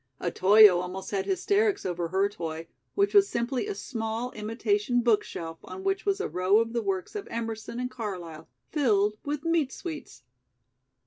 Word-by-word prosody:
Otoyo 190 +2 +6
almost 185 +1 -6
had 195 -2 -1
hysterics 400 +2 +1
over 175 -2 -2
her 190 +3 +2
toy, 165 -4 -6 0.3
which 400 0 +2
was 400 -1 +6
simply 245 +9 -1
a 415 - -3
small, 225 - -4
imitation 245 - 0
book 230 -3 +3
shelf 165 -1 -7
on 380 - -8
which 390 +1 -1
was 395 0 +2
a 425 - -1
row 185 +3 +2
of 230 +1 +1
the 235 - 0
works 195 -3 -3
of 415 -1 -5
Emerson 225 0 -4
and 250 0 -3
Carlyle, 180 -10 -6 0.2
filled 210 -8 +2
with 290 0 -3
"meat 330 -5 +1
sweets." 310 - -8
225 Hz, 170 wpm, -27 LUFS, 190-315 Hz, 0.3 s, Otoyo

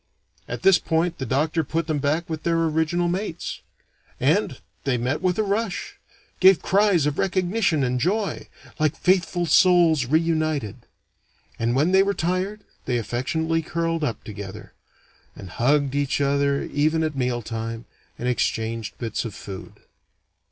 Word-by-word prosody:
At 125 0 -6
this 195 -2 +6
point, 165 +1 0
the 130 - -3
doctor 155 +6 +1
put 165 +3 -2
them 155 -2 -1
back 150 +4 0
with 160 -1 -4
their 170 0 +1
original 160 +2 +1
mates. 175 -1 -3 0.6
And 155 +1 +1 0.2
they 135 -3 +1
met 130 +6 -1
with 185 -1 +1
a 215 - +2
rush! 205 0 -2 0.4
Gave 190 -2 +7
cries 195 -5 +3
of 150 -1 -1
recognition 185 -4 +1
and 125 0 0
joy, 200 - -1 0.3
like 155 0 +1
faithful 180 -1 +1
souls 165 -5 +4
re 155 +5 +4
united. 155 - -2 0.7
And 115 +1 0
when 150 +7 +2
they 190 0 +6
were 200 +1 +1
tired, 185 +5 -1 0.2
they 125 -1 0
affectionately 160 +8 -1
curled 165 0 -2
up 115 -6 -2
together; 100 -2 -9 0.6
and 95 - -10
hugged 140 +4 +1
each 145 0 0
other 140 0 +1
even 155 +3 +1
at 155 -2 -2
mealtime, 115 -2 -3 0.3
and 125 - -3
exchanged 115 -2 -1
bits 115 -3 -3
of 115 -4 -6
food. 95 -3 -9
155 Hz, 150 wpm, -24 LUFS, 125-175 Hz, 0.7 s, Gave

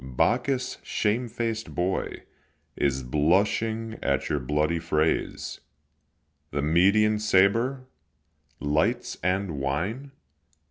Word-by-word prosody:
Bacchus, 125 - 0
shamefaced 115 0 -2
boy, 90 +2 -2 0.5
Is 65 -2 0
blushing 105 - +1
at 70 -1 0
your 75 - 0
bloody 75 +5 0
frays. 80 -1 -1 0.9
The 70 0 -2
Median 100 +7 +4
sabre! 115 +6 +2 0.7
lights 80 +12 0
and 90 -3 -1
wine! 90 - -2
95 Hz, 85 wpm, -26 LUFS, 75-115 Hz, 0.9 s, Median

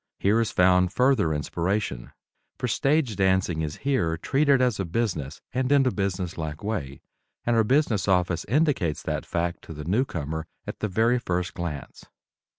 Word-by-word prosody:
Here 105 +4 +3
is 115 - 0
found 90 0 +4
further 125 -8 +3
inspiration, 85 - -2 0.5
for 125 - -2
stage 135 0 +1
dancing 95 -4 +1
is 75 -2 -3
here 85 -13 +1
treated 140 - +2
as 125 -5 +1
a 95 - -1
business 85 - -2
and 130 +2 0
in 140 -2 +5
a 130 - +3
business 95 -5 -2
like 75 +1 -5
way, 75 -11 -4 0.4
and 120 - +2
our 115 - +4
business 120 -4 +2
office 90 -3 +2
indicates 135 - +1
that - - -3
fact 85 0 -2
to - - -8
the 75 0 -7
newcomer 80 - -1 0.2
at - - -6
the 110 - -1
very 115 +5 +2
first 90 -5 -2
glance. 85 -6 -6
95 Hz, 165 wpm, -26 LUFS, 85-120 Hz, 0.5 s, in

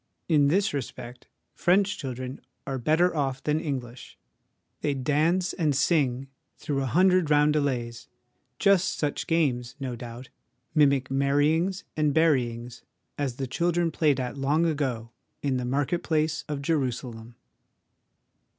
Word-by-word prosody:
In 150 -4 +4
this 195 +6 +2
respect 125 -2 -6 0.3
French 195 +3 +2
children 130 0 -6 0.2
are 135 -1 -3
better 160 +7 +2
off 135 -3 -1
than 150 +1 +1
English; 130 -6 -6 0.6
they 145 -2 0
dance 155 +7 +1
and 155 -6 0
sing 135 -4 +1 0.3
through 140 -2 -2
a 135 - -1
hundred 180 +3 +3
roundelays 145 -6 +1 0.5
just 195 +2 +3
such 145 -2 -2
games, 130 -7 0
no 130 -3 -4
doubt, 120 +1 -9 0.4
mimic 140 -4 +3
marryings 150 +7 +1
and 150 -2 +1
buryings, 125 -7 +1 0.4
as 135 -4 -1
the 135 - -3
children 170 +5 0
played 150 -3 +2
at 125 +2 -4
long 150 +5 +2
ago 130 -8 -2 0.3
in 135 -3 +1
the 125 - -3
market 145 +6 0
place 155 -1 0
of 145 -2 -3
Jerusalem. 125 -6 -2
140 Hz, 130 wpm, -26 LUFS, 130-160 Hz, 0.6 s, In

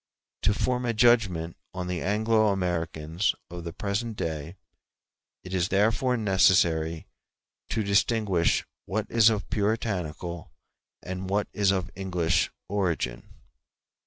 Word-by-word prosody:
To 105 - +3
form 125 +3 0
a 115 - 0
judgment 105 -8 +3 0.2
on 90 -1 -3
the 90 -1 -3
Anglo 110 +2 +2
Americans 85 -2 -1 0.2
of 85 -1 -6
the 85 - -5
present 105 +5 -3
day 80 +1 -4 0.9
it 90 - -8
is 90 -2 +1
therefore 115 +5 +2
necessary 85 -5 +3 0.6
to 110 - 0
distinguish 100 -3 +2 0.2
what 110 +1 -1
is 115 -1 +6
of 105 -3 -2
Puritanical 95 -6 -2 0.5
and 95 +1 -5
what 100 +1 0
is 100 -2 +2
of 95 -1 0
English 90 -4 0 0.2
origin. 85 -11 -2
95 Hz, 120 wpm, -27 LUFS, 85-105 Hz, 0.9 s, is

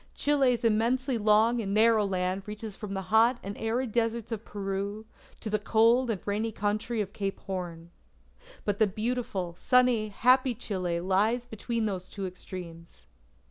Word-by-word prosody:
Chile's 270 -5 +2
immensely 235 +3 +1
long 220 +3 +4
and 200 -1 -2
narrow 220 0 +5
land 185 0 -1
reaches 210 -1 -6
from 200 -1 -6
the 190 - -3
hot 225 +5 +3
and 200 +1 -5
arid 230 +2 -1
deserts 230 0 -1
of 225 -1 -4
Peru, 200 +1 -4 0.4
to - - -6
the 215 0 0
cold 230 +4 +3
and 215 -4 -1
rainy 215 +2 -1
country 215 +2 -1
of 200 0 -5
Cape 195 -2 -3
Horn. 175 -3 -6 0.7
But 205 -1 -1
the 220 - +5
beautiful, 210 -4 -3
sunny, 250 -4 +3
happy 250 +4 +3
Chile 185 -7 -2
lies 210 +7 +1
between 230 0 -3
these 185 -3 -3
two 200 -2 -5
extremes. 175 -2 -9
215 Hz, 155 wpm, -28 LUFS, 195-235 Hz, 0.7 s, narrow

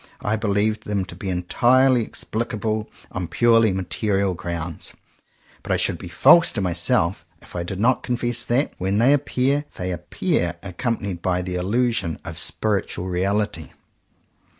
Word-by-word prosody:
I 105 - 0
believe 105 0 0
them 100 -2 -2
to 85 - -9
be 95 +2 -5
entirely 120 +8 +3
explicable 110 -1 -3 0.2
on 90 -2 -3
purely 115 +1 +4
material 95 +1 0
grounds; 85 -1 -5 0.7
but - - -5
I - - +3
should - - 0
be - - -8
false 170 0 +6
to 115 - -2
myself 85 -1 +1 0.2
if - - -15
I 85 - -1
did 90 +2 -5
not 125 +4 +3
confess 120 -1 -1
that, 130 +5 +1
when 95 +2 0
they 125 +6 +5
appear, 140 0 +1
they 90 0 -3
appear 85 0 -1
accompanied 100 -2 -3
by 90 0 0
the 90 0 -4
illusion 100 -1 0
of - - -6
spiritual 100 -3 -1
reality. 95 -2 -1
100 Hz, 150 wpm, -23 LUFS, 90-120 Hz, 0.7 s, false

